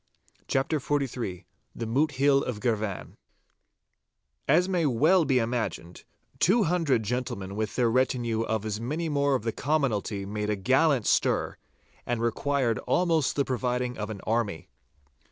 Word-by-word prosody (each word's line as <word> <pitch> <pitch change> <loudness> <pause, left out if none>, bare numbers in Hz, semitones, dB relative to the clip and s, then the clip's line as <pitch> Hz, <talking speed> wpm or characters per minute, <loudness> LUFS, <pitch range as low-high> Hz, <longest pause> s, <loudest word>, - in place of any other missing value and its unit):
*CHAPTER 135 +3 0
XLIII* 125 -10 -2 0.3
*THE 115 - -4
MOOT 145 +7 +1
HILL 140 +1 +3
OF 115 -4 -4
GIRVAN* 110 -5 -2 1.3
As 170 +6 +4
may 175 -5 +1
well 155 +8 +4
be 135 -2 +2
imagined, 115 -8 -3 0.3
two 210 +6 +4
hundred 160 - +1
gentlemen 100 -4 -3
with 110 +1 -3
their 125 -2 +2
retinue 120 -2 +1
of 110 -1 -2
as 110 0 -3
many 155 +7 -2
more 140 -2 +2
of 125 - -2
the 115 -1 -2
commonalty 115 -9 -1
made 105 +1 -3
a 105 - +1
gallant 130 +5 +2
stir, - - +1 0.5
and 120 -1 -2
required 120 +1 0
almost 165 -6 +2
the 140 - +1
providing 125 -1 -1
of 105 0 -3
an 105 -3 -6
army. 110 -6 -2
125 Hz, 145 wpm, -27 LUFS, 110-145 Hz, 1.3 s, As